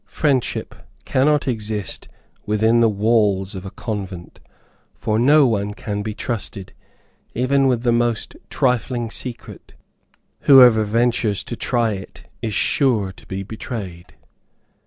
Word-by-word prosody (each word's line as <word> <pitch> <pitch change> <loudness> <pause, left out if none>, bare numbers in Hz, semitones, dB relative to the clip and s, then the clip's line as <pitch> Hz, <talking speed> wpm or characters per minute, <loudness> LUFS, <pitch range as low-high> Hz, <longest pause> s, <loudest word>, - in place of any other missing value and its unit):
Friendship 140 -5 -1 0.3
cannot 145 +2 +2
exist 105 -5 -4 0.4
within 110 +2 +3
the 115 -1 +4
walls 105 -2 +1
of 95 0 -7
a - - -5
convent, 95 -5 -6 0.6
for 110 0 -1
no 145 +4 +5
one 105 -4 -1
can 105 -1 -4
be 105 0 -5
trusted, 100 -5 -5 0.6
even 135 +3 +2
with 125 -2 0
the 120 - +2
most 120 -1 0
trifling 125 -2 0
secret. 125 0 -7 0.7
Whoever 125 -5 +8
ventures 115 -1 +1
to 120 - -5
try 120 -1 0
it 95 -1 -9 0.2
is 110 -3 -3
sure 115 -9 +1
to - - -18
be 95 0 -4
betrayed. 95 -4 -7
110 Hz, 125 wpm, -20 LUFS, 105-125 Hz, 0.7 s, Whoever